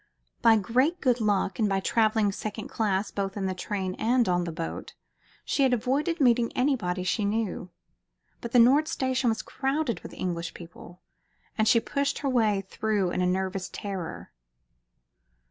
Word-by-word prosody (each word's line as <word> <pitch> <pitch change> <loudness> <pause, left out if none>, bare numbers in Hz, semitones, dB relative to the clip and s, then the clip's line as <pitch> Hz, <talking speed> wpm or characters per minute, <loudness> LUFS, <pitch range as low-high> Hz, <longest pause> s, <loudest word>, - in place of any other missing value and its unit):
By 230 -2 +6
great 255 - +1
good 250 -2 +1
luck, 205 -2 0
and 215 -2 +2
by 195 0 +1
travelling 215 0 +2
second 215 +1 -6
class 200 -2 -1
both 195 0 -3
in 195 - -2
the 190 - -1
train 185 0 -3
and 240 +1 +2
on 175 -1 +1
the 170 - -4
boat, 165 0 -6 0.5
she - - 0
had 265 -2 +4
avoided 275 +8 0
meeting 240 -3 +3
anybody 235 -10 0
she 210 +4 0
knew. 205 -3 -2 0.7
But 235 - -6
the 245 - +3
Nord 270 +6 +6
Station 260 -5 0
was 220 -1 -1
crowded 270 -1 -2
with - - -11
English 170 -2 -4
people, 175 +1 -12 0.5
and 220 0 +1
she 230 - +5
pushed 280 +4 -1
her 280 - -2
way 220 -6 +2
through 205 -4 -1
in 180 - -1
a 180 - +2
nervous 190 +1 -2
terror. 195 -6 -6
220 Hz, 165 wpm, -27 LUFS, 190-250 Hz, 0.7 s, By